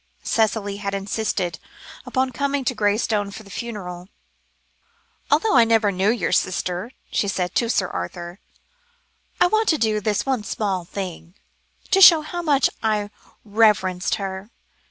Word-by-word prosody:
Cicely 205 -2 0
had 200 -1 -3
insisted 195 -4 -2 0.5
upon 260 0 0
coming 280 +1 -1
to 255 - +1
Graystone 210 -1 0
for 215 +2 -10
the 200 - -15
funeral. 190 -6 -6 1.2
"Although 445 -9 +3
I 235 - +7
never 225 -2 +3
knew 190 +2 +1
your 235 +1 0
sister," 180 +3 -1 0.2
she 200 - 0
said 180 -2 -2
to 235 - +1
Sir 190 -5 +1
Arthur, 175 - -6 1.0
"I - - +6
want 435 +4 +2
to 315 - +3
do 215 -4 0
this 210 0 0
one 260 -5 -1
small 195 -3 -2
thing, 180 -2 -7 0.6
to 390 - +4
show 335 -4 +9
how 345 +3 -5
much 285 -5 +3
I 210 -2 -1 0.3
reverenced 200 -4 +2
her. 195 +1 -6
210 Hz, 145 wpm, -22 LUFS, 190-235 Hz, 1.2 s, show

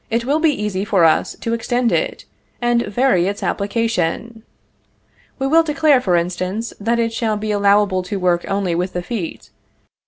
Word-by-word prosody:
_ - - -42
It 230 +1 -1
will 290 +4 +1
be 320 0 +3
easy 210 -8 -2
for 200 -5 +3
us 160 - +2
to 230 - -2
extend 240 +1 0
it, - - -1 0.3
and 240 -2 +1
vary 205 -4 +2
its 200 +1 -4
application. 225 +1 -1 1.0
We 270 - -2
will 320 +4 +5
declare, 300 -4 +3
for 180 -7 +1
instance, 185 +6 -2
that 230 +3 0
it 230 -1 0
shall 225 -2 -1
be 215 +1 -3
allowable 200 -2 +3
to - - -2
work 180 -2 +1
only 195 -3 -1
with 180 +2 -2
the 180 - -3
feet. 190 -4 -6
215 Hz, 180 wpm, -19 LUFS, 185-235 Hz, 1.0 s, will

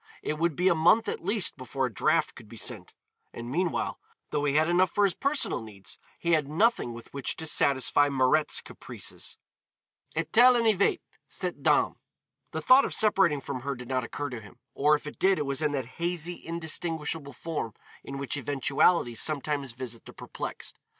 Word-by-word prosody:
It 150 - -2
would 170 -2 +1
be 180 +4 +2
a 190 - +6
month 170 +8 +4
at - - -3
least 200 -3 +1
before 130 +1 -2
a 125 - -4
draft 95 - +2
could - - -14
be - - -11
sent, - - -4 0.4
and 120 +1 -7
meanwhile, 175 +3 -1 0.3
though 145 -1 0
he 145 0 +1
had 155 +1 +4
enough 180 +1 +3
for 205 - +1
his 195 -3 +3
personal 280 - -1
needs, 100 -3 -9 0.2
he 170 - -1
had 155 -4 +3
nothing 165 - +2
with 115 0 -11
which 140 -2 -2
to 160 - -5
satisfy 145 -1 +3
Mirette's 140 +3 +2
caprices. - - -7 0.8
Et 160 +2 -2
elle 250 +2 +8
en 235 -1 +2
avait, 215 - +3 0.3
cette - - -3
dame! - - +2 0.5
The - - -4
thought 260 +2 +7
of - - -1
separating 195 -9 +3
from 135 -1 -5
her 140 +2 -3
did 125 0 -10
not 130 -1 0
occur 145 +3 -5
to 120 -3 -6
him, 105 +3 -15 0.2
or 150 +2 +4
if 150 - -6
it 150 - -8
did 190 0 +4
it 150 - -1
was 140 +1 -2
in 150 -1 +1
that 135 -3 -2 0.2
hazy 175 0 -3
indistinguishable 160 -3 -3
form 150 -7 -4 0.3
in 140 - -7
which 140 +1 -2
eventualities 140 -1 +2
sometimes 145 -3 -1
visit 120 -2 -7
the - - -11
perplexed. - - -7
150 Hz, 190 wpm, -28 LUFS, 135-175 Hz, 0.8 s, elle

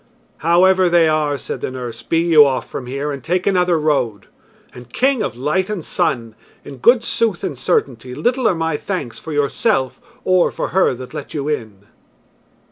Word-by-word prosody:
"However 185 +3 +4
they 170 -1 +4
are," 150 -2 +1
said - - -6
the - - -2
nurse, 120 -3 -7
"be 165 +7 -1
you 165 -2 +6
off 135 -2 -1
from 125 - -7
here 140 +3 -3
and 140 -3 -6
take 180 +2 -1
another 180 -3 +2
road. 135 -10 0 0.5
And, 125 -1 -13
King 265 - +1
of 120 -3 -3
Light 155 +9 0
and 200 -7 -4
Sun! 120 - -1 0.3
in 135 - -9
good 235 - +4
sooth 225 -5 -1
and 145 - -3
certainty, 125 -1 -1
little 250 - +1
are 185 - +2
my 160 -2 -1
thanks 145 - -5
for 160 - -8
yourself 140 - 0 0.2
or 185 -1 +3
for - - -4
her 185 -8 +2
that 125 +1 -10
let - - -7
you 145 -1 -3
in!" 110 -10 -4
150 Hz, 185 wpm, -19 LUFS, 130-180 Hz, 0.5 s, you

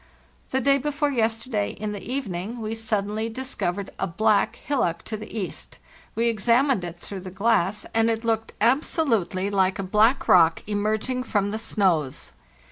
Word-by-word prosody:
"The 265 - +1
day 275 +2 +4
before 295 +1 -1
yesterday, 225 -3 0
in 210 0 -3
the 205 -1 -6
evening, 230 -4 -4
we 220 0 -3
sud 220 -3 -1
denly 215 +2 -3
discovered 205 -6 -3
a 195 - 0
black 215 +4 +2
hillock 215 - -1
to 220 - -5
the 215 0 -8
east. 210 -5 -5 0.4
We 230 +1 +2
ex 225 -2 -2
amined 245 -3 +4
it 175 -1 -6
through 195 +2 -7
the 185 0 -8
glass 200 0 +1
and 225 0 +3
it 225 0 -1
looked 225 -1 -1
absolutely 230 - +1
like 190 -1 +2
a 195 - -3
black 215 +7 +3
rock 165 -2 +5
emerging 215 +5 -1
from 205 -3 0
the 220 - -3
snows. 180 - 0
215 Hz, 170 wpm, -25 LUFS, 195-235 Hz, 0.4 s, rock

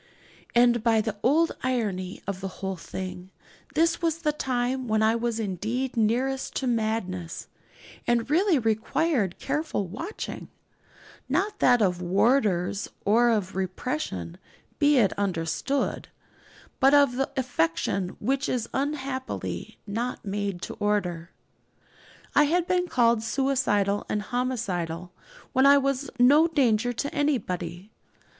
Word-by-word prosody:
And 240 -1 +5
by 230 -2 +4
the 215 -1 -2
odd 320 +6 +3
irony 205 -8 -2
of 195 -1 -4
the 195 - -3
whole 190 0 -5
thing, 185 +1 -7 0.5
this 330 +3 +2
was 330 -2 +1
the 300 - +3
time 255 -2 -1
when 220 0 +2
I 220 +1 +4
was 235 -1 -1
indeed 225 +6 -2
nearest 250 +4 0
to 270 - -1
madness, 215 -8 -2 0.6
and 240 -1 +2
really 340 +3 +3
required 225 - 0
careful 285 -7 -2
watching; 260 - -6 0.8
not 415 +1 0
that 245 -3 +5
of 180 -2 +1
warders 195 0 +1 0.2
or 235 +4 +4
of 205 -6 0
repression, 185 - -3 0.4
be 290 -1 +4
it 210 -6 +4
understood, 195 - -1 0.7
but 270 +2 +6
of 280 -4 +4
the 270 - 0
affection 185 -6 0
which 270 +5 0
is 240 -3 -1
unhappily 270 -2 -3
not 230 +4 -3
made 200 -2 -3
to - - -5
order. 180 -5 -1 1.0
I 295 - +5
had 340 +3 +1
been 360 0 +1
called 235 -6 +3
suicidal 225 -6 +1
and 210 -1 -1
homicidal 185 -9 -2 0.4
when 260 +2 +5
I 280 0 +8
was 275 -1 0
no 285 +6 +6
danger 245 -7 +2
to 280 +4 -3
anybody. 195 - -2
235 Hz, 125 wpm, -26 LUFS, 195-270 Hz, 1.0 s, I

